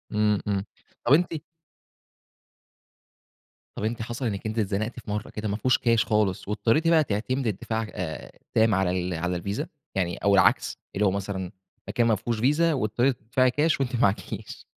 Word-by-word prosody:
إمم، 105 -1 +3
إمم. 100 -1 0 0.4
طب 120 - +5
أنتِ 170 +3 +3 2.4
طب - - -5
أنتِ 115 +2 -2
حصل 120 +3 -4
إنِّك 100 -3 -3
أنتِ 110 +1 -2
اتزنقتِ 110 +3 -1
في 115 - -11
مرة 105 0 -3
كده، 105 0 -4
مافيهوش 105 +5 +2
كاش 115 -3 +2
خالص، 105 -4 +1
واضطريتِ 115 +10 +1
بقى 165 -2 +5
تعتمدي 125 +2 -1
الدفاع 110 +3 -3
آآ 80 -4 -5
التام 110 -1 +2
على 95 -1 +2
ال 90 0 -1
على 90 +2 -1
الفيزا؟ 100 - -3 0.3
يعني 90 -3 0
أو 100 0 +2
العكس، 100 - +3 0.2
اللي 105 +1 +2
هو 95 - +4
مثلًا 95 -2 -3 0.4
مكان 120 -1 +1
مافيهوش 110 +1 0
فيزا، 150 +7 +3
واضطريتِ 120 +1 +1
تدفعي 130 +3 +2
كاش 150 +3 +2
وأنتِ 130 -2 -1
معاكيش 105 -1 -1
110 Hz, 160 wpm, -26 LUFS, 100-120 Hz, 2.4 s, طب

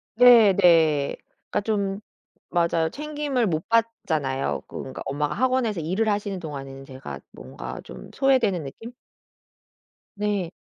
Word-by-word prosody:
네. 235 -4 +8
네. 160 -6 +4 0.3
그러니까 210 - 0
좀 200 -2 -1 0.5
맞아요. 170 -2 +1
챙김을 295 - -2
못 160 -2 -1
받잖아요. 160 -12 0
그러니까 130 - -7
엄마가 145 +2 -2
학원에서 250 -4 +1
일을 190 +8 0
하시는 205 -2 -1
동안에는 135 -4 -7
제가 130 - -8
뭔가 65 0 -8
좀 65 -2 -11
소외되는 245 - +2
느낌? 225 - -9 1.3
네. 205 -4 -1
185 Hz, 280 characters per minute, -24 LUFS, 145-225 Hz, 1.3 s, 네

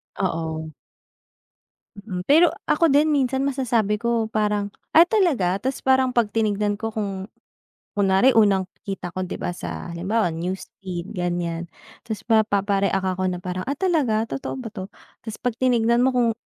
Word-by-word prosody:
Oo. 160 -3 -3 1.2
Mm, 195 -3 -6
pero 320 +3 +6 0.2
ako 325 0 +3
din 290 +3 +4
minsan 265 -1 +1
masasabi 235 -6 +1
ko 235 -2 0
parang, 210 -2 0 0.2
“Ah 335 +2 +7
talaga?” 310 - +2
Ta’s 265 +1 -2
parang 260 -1 +4
‘pag 235 -3 +2
tinignan 210 -2 +1
ko 225 +2 -4
kung 200 -2 -4 0.7
kunwari 200 +5 +4
unang 195 -4 +4 0.2
kita 195 -3 -5
ko, 185 - -1
'di 180 - -5
ba, 175 - -3
sa - - -6
halimbawa 190 +5 0
news 180 +4 -4
feed 185 0 -6
ganiyan. 175 -1 -2 0.4
Ta’s 215 -3 -5
mapapa-react 200 -3 +2
ako 185 - -1
na 180 - -4
parang, 185 0 -3
“Ah, 280 - -1
talaga? 285 -13 +1
Totoo 270 - -4
ba 240 - -6
'to?” 190 -2 -6 0.4
Ta’s 220 -1 -6
‘pag 245 -2 -1
tinignan 240 -1 +3
mo 260 - +4
kung 235 -2 +3
210 Hz, 155 wpm, -23 LUFS, 190-250 Hz, 1.2 s, Ah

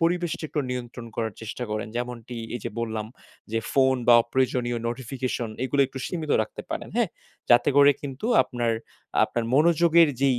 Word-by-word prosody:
পরিবেশটা 170 -1 0
একটু 150 - -1
নিয়ন্ত্রণ 120 -1 -5
করার 110 -3 -2
চেষ্টা 115 +2 -5
করেন। 105 0 -3
যেমনটি 120 0 -5 0.2
এই 120 - -4
যে - - -2
বললাম 110 -2 -3 0.5
যে 115 - +2
ফোন 130 -1 +4
বা 120 - +9
অপ্রয়োজনীয় 120 -1 0
নোটিফিকেশন 125 -1 -3 0.2
এগুলো 140 +2 +1
একটু 135 0 -8
সীমিত 160 -4 -4
রাখতে 110 - -8
পারেন। - - -4
হ্যাঁ? - - +2 0.4
যাতে 120 - +6
করে 145 0 +8
কিন্তু 140 +7 -5 0.2
আপনার, 120 -2 -1 0.5
আপনার 120 -1 -2
মনোযোগের 170 +1 +5
যেই 135 -3 +3
125 Hz, 160 wpm, -25 LUFS, 120-145 Hz, 0.5 s, বা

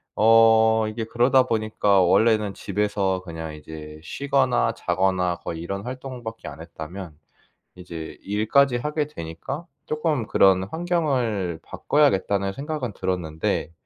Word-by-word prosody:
어 110 0 +5
이게 110 +1 -4
그러다 125 +3 +3
보니까 110 -4 +2
원래는 105 +2 +3
집에서 100 -1 -1
그냥 80 -2 -7
이제 75 0 -10
쉬거나 130 - +1
자거나 90 -1 0
거의 80 -1 -6
이런 100 +3 -4
활동밖에 125 -3 -7
안 70 +1 -11
했다면 85 0 -9 0.6
이제 85 -3 -8
일까지 110 +6 +2
하게 150 +3 -2
되니까 130 - -7 0.2
쪼끔 155 -6 -1
그런 95 -1 +4
'환경을 125 - -1
바꿔야겠다.'는 100 -9 +1
생각은 140 -5 -4
들었는데 85 -4 -2
105 Hz, 290 characters per minute, -24 LUFS, 90-125 Hz, 0.6 s, 어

